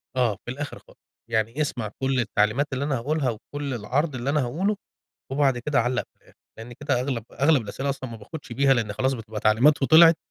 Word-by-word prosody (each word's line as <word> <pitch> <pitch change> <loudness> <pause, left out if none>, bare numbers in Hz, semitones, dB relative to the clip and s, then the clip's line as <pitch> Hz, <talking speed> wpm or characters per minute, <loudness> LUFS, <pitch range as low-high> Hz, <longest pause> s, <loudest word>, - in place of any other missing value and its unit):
آه، 120 -5 +2
في 120 - -4
الآخر 145 +3 -6
خالص، - - -21 0.3
يعني 115 +5 0
اسمع 120 -7 -2
كلّ 135 -1 +1
التعليمات 110 +4 +1
اللي 135 +2 -1
أنا 140 -2 0
هاقولها 140 +2 0
وكلّ 140 +5 -5
العرض 135 +7 -1
اللي 130 +2 -3
أنا 150 +1 +2
هاقوله، 185 +12 0 0.6
وبعد 135 -2 +2
كده 145 +3 0
علّق 125 +1 0
في - - -42
الأخر، - - -23 0.2
لأن 115 +2 -9
كده 140 -1 -1
أغلب 125 -4 -2
أغلب 140 -1 +3
الأسئلة 135 +6 -4
أصلًا 135 -2 -4
ما 115 - -8
باخدش 135 +4 -9
بيها، 135 +2 +4
لأن 110 -4 -1
خلاص 130 +5 0
بتبقى 110 -3 -6
تعليمات 120 +9 +4
وطِلعت، 165 +3 +7
130 Hz, 205 wpm, -25 LUFS, 115-145 Hz, 0.6 s, وطِلعت